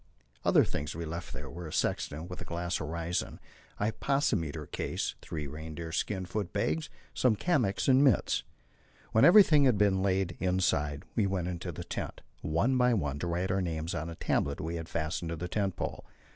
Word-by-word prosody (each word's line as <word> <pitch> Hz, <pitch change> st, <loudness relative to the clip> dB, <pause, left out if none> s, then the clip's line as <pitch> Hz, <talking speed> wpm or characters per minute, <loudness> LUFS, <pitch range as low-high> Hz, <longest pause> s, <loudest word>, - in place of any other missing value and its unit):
Other -, -, +5 dB
things 75 Hz, +2 st, -4 dB
we 85 Hz, +1 st, -4 dB
left 85 Hz, +2 st, -5 dB
there -, -, -6 dB
were 85 Hz, 0 st, -7 dB
a -, -, -8 dB
sextant 75 Hz, +3 st, -1 dB
with 90 Hz, -, -7 dB
a -, -, -3 dB
glass 85 Hz, +1 st, -2 dB
horizon, 85 Hz, +3 st, -3 dB, 0.4 s
a 105 Hz, +2 st, +1 dB
hypsometer 95 Hz, -, 0 dB
case, -, -, -3 dB
three 75 Hz, -2 st, -5 dB
reindeer 80 Hz, +3 st, -6 dB
skin 95 Hz, +3 st, -1 dB
foot 100 Hz, +1 st, -3 dB
bags, 150 Hz, +10 st, -1 dB, 0.2 s
some 125 Hz, -4 st, +3 dB
kamiks 120 Hz, -, +1 dB
and 135 Hz, +1 st, +6 dB
mits. 135 Hz, -6 st, +3 dB, 0.7 s
When 110 Hz, -, +4 dB
everything 170 Hz, -6 st, +8 dB
had 125 Hz, -5 st, +4 dB
been 100 Hz, -2 st, +3 dB
laid 95 Hz, -2 st, 0 dB
inside, 85 Hz, -6 st, +1 dB
we 105 Hz, -4 st, +3 dB
went 90 Hz, -2 st, -1 dB
into 90 Hz, -2 st, -4 dB
the -, -, -6 dB
tent, -, -, -5 dB, 0.2 s
one 100 Hz, +13 st, +1 dB
by 125 Hz, -1 st, +4 dB
one, 70 Hz, -7 st, -1 dB
to 85 Hz, -, -2 dB
write 90 Hz, +2 st, -1 dB
our 95 Hz, 0 st, +1 dB
names 80 Hz, -1 st, -2 dB
on 80 Hz, +3 st, -3 dB
a 85 Hz, -, -7 dB
tablet 70 Hz, -2 st, 0 dB
we 80 Hz, +2 st, -3 dB
had 80 Hz, 0 st, -6 dB
fastened 80 Hz, +1 st, -2 dB
to 85 Hz, -, -2 dB
the 90 Hz, +2 st, -4 dB
tent 95 Hz, 0 st, -1 dB
pole. -, -, -4 dB
90 Hz, 190 wpm, -30 LUFS, 80-105 Hz, 0.7 s, everything